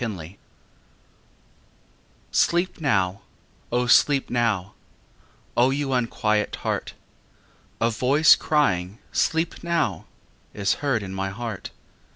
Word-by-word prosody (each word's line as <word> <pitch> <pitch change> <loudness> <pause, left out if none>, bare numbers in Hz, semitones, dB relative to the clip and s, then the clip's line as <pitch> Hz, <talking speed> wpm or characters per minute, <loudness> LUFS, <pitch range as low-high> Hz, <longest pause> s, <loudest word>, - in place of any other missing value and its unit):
XXXIV 100 -5 -5 1.9
Sleep 175 0 +1
now, 95 -9 +1 0.5
O 125 +1 +1
sleep 135 +3 +4
now, 110 -5 0 0.8
O 120 +2 +4
you 135 0 -1
unquiet 110 -3 0
heart! - - -3 0.8
A 115 +1 +2
voice 135 +7 +5
crying 95 - 0
"Sleep 165 +2 0
now" 170 -1 -1 0.5
Is 100 -1 +1
heard 135 -7 0
in 95 -1 -7
my 95 0 -2
heart. 110 -1 -6
120 Hz, 100 wpm, -24 LUFS, 100-140 Hz, 1.9 s, voice